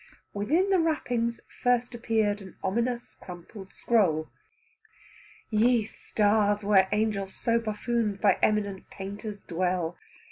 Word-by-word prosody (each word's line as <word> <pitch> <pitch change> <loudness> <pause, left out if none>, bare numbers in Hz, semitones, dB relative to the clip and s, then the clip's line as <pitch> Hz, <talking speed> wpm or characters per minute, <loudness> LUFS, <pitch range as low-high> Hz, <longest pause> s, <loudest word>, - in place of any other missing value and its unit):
Within 315 - +1
the 380 - +4
wrappings 245 -8 0 0.2
first 245 0 +1
appeared 220 -3 0
an 190 -1 -11
ominous 235 +5 -1
crumpled 185 +2 -11
scroll. 175 -9 +1 1.2
Ye 225 +1 +3
stars, 205 -1 +1
where 195 -2 +4
angels 210 -2 -1
so 230 0 +1
buffooned 215 -1 -1
by 200 -3 +3
eminent 200 -3 0
painters 200 +1 -7
dwell! 175 -1 -1
210 Hz, 110 wpm, -28 LUFS, 195-235 Hz, 1.2 s, the